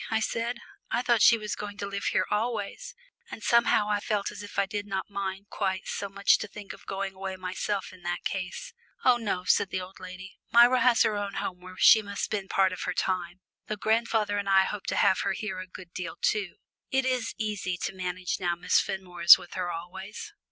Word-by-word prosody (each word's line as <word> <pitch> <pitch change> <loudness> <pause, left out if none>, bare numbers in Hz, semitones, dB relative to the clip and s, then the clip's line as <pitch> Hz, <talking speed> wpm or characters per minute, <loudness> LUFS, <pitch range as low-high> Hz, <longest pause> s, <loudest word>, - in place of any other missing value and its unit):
I 220 -1 +1
said. 230 +2 -2 0.3
"I 240 +2 0
thought 240 -3 +3
she 230 - +7
was 210 -1 -4
going 205 -1 -7
to 200 - -4
live 200 0 -4
here - - +2
always," 225 - -2 0.3
and 220 - -8
somehow 235 -3 +4
I 210 -1 +1
felt 205 -1 -1
as 205 - -9
if 205 - -10
I 200 - +3
did 205 +1 -4
not 195 0 -4
mind 195 0 -4
quite 190 -2 -2
so 200 - -3
much 200 +1 +3
to - - -4
think 205 0 -9
of - - -16
going 195 0 -3
away 190 0 -5
myself 185 +2 -3
in 185 - -15
that 175 0 -3
case. 190 - -4 0.3
"Oh 250 -1 +6
no," 205 -6 -2
said 185 - +3
the 185 - -2
old 185 +1 -9
lady, 185 +1 -10
"Myra 240 +2 +6
has 245 -2 +5
her 215 - +1
own 205 -1 -3
home 180 -1 -4
where 185 0 -11
she 220 - +7
must 200 -1 -5
spend 200 -3 -2
part 190 -1 +3
of 185 - -6
her - - -2
time, 185 -1 -2 0.3
though 215 - -2
grandfather 215 -1 +1
and 200 -1 -3
I 190 0 +6
hope 205 +1 -5
to - - -1
have 190 - +4
her 195 -3 0
here 215 0 -4
a 185 - -7
good 180 -1 -12
deal 180 -1 -5
too. 200 -4 0 0.3
It 265 0 +1
is 250 -3 -1
easy 205 -4 -2
to - - -2
manage 180 -1 -3
now 175 -2 0
Miss 175 +1 +2
Fenmore 180 -2 -5
is 170 - +11
with 180 -2 -12
her 180 -1 -2
always." 190 - -7
200 Hz, 225 wpm, -28 LUFS, 185-215 Hz, 0.3 s, is